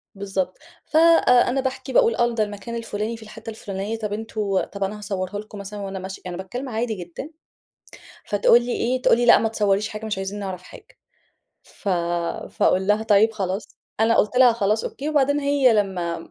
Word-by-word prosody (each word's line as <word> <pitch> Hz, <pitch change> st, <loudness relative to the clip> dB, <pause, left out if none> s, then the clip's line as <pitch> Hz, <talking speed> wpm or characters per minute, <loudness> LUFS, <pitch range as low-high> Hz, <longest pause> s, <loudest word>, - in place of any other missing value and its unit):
بالضبط، 195 Hz, -2 st, -3 dB, 0.3 s
فأنا 310 Hz, -6 st, +4 dB
آآ، -, -, +2 dB
باحكي 260 Hz, 0 st, -4 dB
باقول 230 Hz, -1 st, +4 dB
آه 240 Hz, 0 st, +1 dB
ده 225 Hz, -2 st, +1 dB
المكان 205 Hz, +2 st, -6 dB
الفُلاني 225 Hz, 0 st, -4 dB
في 220 Hz, -, -12 dB
الحتة 220 Hz, +1 st, -10 dB
الفُلانية 205 Hz, 0 st, -5 dB
طَب 210 Hz, -2 st, -3 dB
أنتم 210 Hz, -3 st, -2 dB
طَب 200 Hz, -1 st, -5 dB
أنا 205 Hz, +2 st, -3 dB
هاصورها 200 Hz, -1 st, -4 dB
لكم 215 Hz, 0 st, -10 dB
مثلًا 200 Hz, +1 st, -7 dB
وأنا 195 Hz, -1 st, -5 dB
ماشية، 190 Hz, +1 st, -7 dB
يعني 180 Hz, -1 st, -5 dB
أنا 190 Hz, -, -5 dB
باتكلم 250 Hz, +8 st, -6 dB
عادي 225 Hz, 0 st, -2 dB
جدًا، 180 Hz, -, -8 dB, 1.0 s
فتقول 210 Hz, +3 st, +4 dB
لي 245 Hz, -, -3 dB
إيه، 255 Hz, +2 st, -1 dB
تقول -, -, +4 dB
لي: 240 Hz, -, +1 dB
"لأ 240 Hz, -, +8 dB
ما 225 Hz, -, 0 dB
تصوريش 205 Hz, -1 st, +1 dB
حاجة، 215 Hz, +1 st, -7 dB
مش 210 Hz, -3 st, -2 dB
عايزين 195 Hz, +2 st, -4 dB
نعرف 190 Hz, -3 st, -5 dB
حاجة." 450 Hz, -, -15 dB, 0.7 s
ف -, -, -9 dB, 0.6 s
فأقول 190 Hz, +1 st, +2 dB
لها: 210 Hz, +2 st, +2 dB
"طيب 220 Hz, 0 st, +4 dB
خلاص." 195 Hz, -1 st, -3 dB, 0.3 s
أنا 225 Hz, +1 st, +4 dB
قُلت 210 Hz, +4 st, +2 dB
لها 250 Hz, -2 st, +7 dB
خلاص 215 Hz, -1 st, 0 dB
أوكي، 285 Hz, +3 st, -5 dB
وبعدين 285 Hz, -1 st, +2 dB
هي 280 Hz, -3 st, +3 dB
لما 190 Hz, -5 st, 0 dB
215 Hz, 190 wpm, -23 LUFS, 195-240 Hz, 1.0 s, لأ